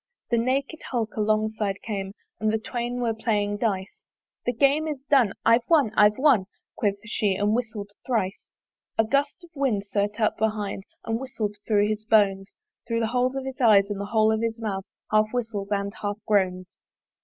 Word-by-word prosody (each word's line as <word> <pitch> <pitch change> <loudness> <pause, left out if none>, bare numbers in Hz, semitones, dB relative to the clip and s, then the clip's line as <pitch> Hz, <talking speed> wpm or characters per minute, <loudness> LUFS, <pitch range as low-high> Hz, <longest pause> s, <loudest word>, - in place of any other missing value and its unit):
The 235 - +3
naked 275 +6 -1
Hulk 230 -4 -2
alongside 215 -1 0
came 195 -3 -4 0.3
And 215 0 +1
the 220 - +1
Twain 240 +2 -3
were 230 -2 +1
playing 205 -2 0
dice; 195 -3 -2 0.5
"The - - +4
Game 280 +6 +2
is 290 -4 -4
done! 250 -8 +5
I've 230 +2 +6
won, 295 -10 +4
I've 210 -1 +5
won!" 260 -9 +4 0.3
Quoth 200 -2 0
she, 210 -3 0
and 205 +2 +1
whistled 220 -4 -3 0.2
thrice. 220 -6 -1 0.5
A 225 - +5
gust 280 +8 0
of 345 - -15
wind 265 -9 0
sterte 205 +1 -2
up 215 - +1
behind 210 -3 -1 0.2
And 225 0 -1
whistled 235 -6 -4
thro' 205 -2 +3
his 215 0 -2
bones; 200 -3 +2 0.4
Thro' 230 -1 0
the 225 - +1
holes 250 +1 +1
of 270 -1 -3
his 265 +1 -6
eyes 205 -4 +5
and 200 -1 -3
the - - -3
hole 220 +1 +3
of 220 0 0
his 230 0 -1
mouth 200 -4 -3 0.3
Half 215 +1 +3
whistles 220 -5 -2
and 200 -1 -1
half 205 -1 -2
groans. 185 -3 0
220 Hz, 185 wpm, -25 LUFS, 205-240 Hz, 0.5 s, I've